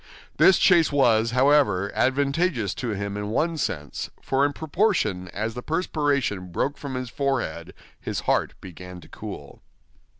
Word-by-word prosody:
This 190 - +6
chase 170 -4 +4
was, 115 -5 +3
however, 125 -7 +3
advantageous 140 - +1
to 125 - -4
him 100 0 -4
in 105 0 -4
one 165 +9 0
sense, 75 - -4
for 135 +1 0
in - - -4
proportion 150 - 0
as 110 +5 -4
the 125 - -6
perspiration 140 - -1
broke 140 +11 -1
from 140 -3 -6
his 130 -2 -4
forehead, 135 - -2 0.2
his - - -4
heart - - 0
began 90 0 -10
to - - -15
cool. - - -9
130 Hz, 145 wpm, -24 LUFS, 100-145 Hz, 0.2 s, This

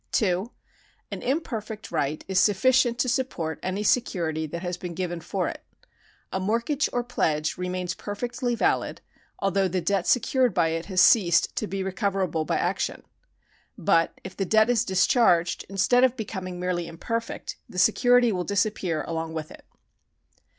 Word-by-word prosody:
2. 195 +2 +1 0.6
An - - -5
imperfect 225 -6 -3
right 145 +2 -2
is 190 -1 +2
sufficient 235 +5 +3
to 250 - +1
support 235 -11 -2
any 190 +3 -2
security 165 -9 0
that 170 +4 -6
has 180 0 -2
been 180 -1 -7
given 175 -1 -3
for - - -2
it. - - -6 0.7
A 190 - 0
mortgage 235 +9 0
or 245 - -1
pledge 155 -10 0
remains 180 0 -3
perfectly 240 +5 -3
valid, 225 - 0 0.4
although 195 0 +1
the 185 +1 -1
debt 195 0 0
secured 250 -2 +2
by 165 -2 +3
it 165 +1 -3
has 185 -2 +2
ceased 175 -8 +4
to 215 - -2
be 195 -1 -3
recoverable 190 -4 -1
by - - 0
action.^ - - -2 0.7
But 165 0 +1
if 190 0 -8
the 195 - -1
debt 220 +4 +4
is 235 -1 +2
discharged, 185 -3 +3
instead 195 +6 +3
of 260 -1 +3
becoming 185 -4 -5
merely 180 -2 -2
imperfect, 230 +8 -4
the - - -10
security 245 +4 +4
will 180 -3 -1
dis 200 +3 +1
appear 175 -7 -2
along 165 -1 -4
with 155 -1 -5
it. - - -14
190 Hz, 160 wpm, -26 LUFS, 175-230 Hz, 0.7 s, ceased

